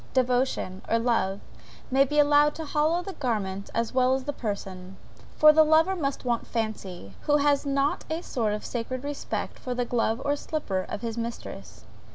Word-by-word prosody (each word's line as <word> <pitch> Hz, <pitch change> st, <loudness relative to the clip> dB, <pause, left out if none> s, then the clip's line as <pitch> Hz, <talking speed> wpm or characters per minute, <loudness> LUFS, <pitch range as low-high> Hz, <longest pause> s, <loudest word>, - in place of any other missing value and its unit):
Devotion, 250 Hz, -7 st, +1 dB
or 230 Hz, -, +3 dB
love, 225 Hz, -5 st, 0 dB, 0.5 s
may 270 Hz, +1 st, +5 dB
be 295 Hz, +2 st, -2 dB
allowed 295 Hz, 0 st, +5 dB
to 320 Hz, -, -5 dB
hallow 310 Hz, +4 st, +1 dB
the 390 Hz, -, -6 dB
garments 200 Hz, -, -2 dB
as 230 Hz, +1 st, -1 dB
well 255 Hz, 0 st, +3 dB
as 265 Hz, -, -3 dB
the 290 Hz, -, -3 dB
person; 195 Hz, -5 st, -5 dB, 0.4 s
for 305 Hz, 0 st, +8 dB
the 315 Hz, -, +6 dB
lover 320 Hz, +5 st, +4 dB
must 275 Hz, -6 st, -3 dB
want 240 Hz, -2 st, -1 dB
fancy, 200 Hz, -, -4 dB
who 295 Hz, 0 st, +5 dB
has 285 Hz, 0 st, +2 dB
not 275 Hz, +1 st, +1 dB
a 320 Hz, +2 st, -2 dB
sort 220 Hz, -4 st, -1 dB
of 210 Hz, -, -4 dB
sacred 250 Hz, +2 st, -4 dB
respect 290 Hz, 0 st, -4 dB
for 250 Hz, -1 st, -4 dB
the 245 Hz, 0 st, 0 dB
glove 230 Hz, -1 st, 0 dB
or 285 Hz, 0 st, +2 dB
slipper 210 Hz, -12 st, -3 dB
of 210 Hz, -, -4 dB
his 230 Hz, -1 st, -3 dB
mistress. 230 Hz, 0 st, -7 dB
255 Hz, 185 wpm, -27 LUFS, 220-290 Hz, 0.5 s, for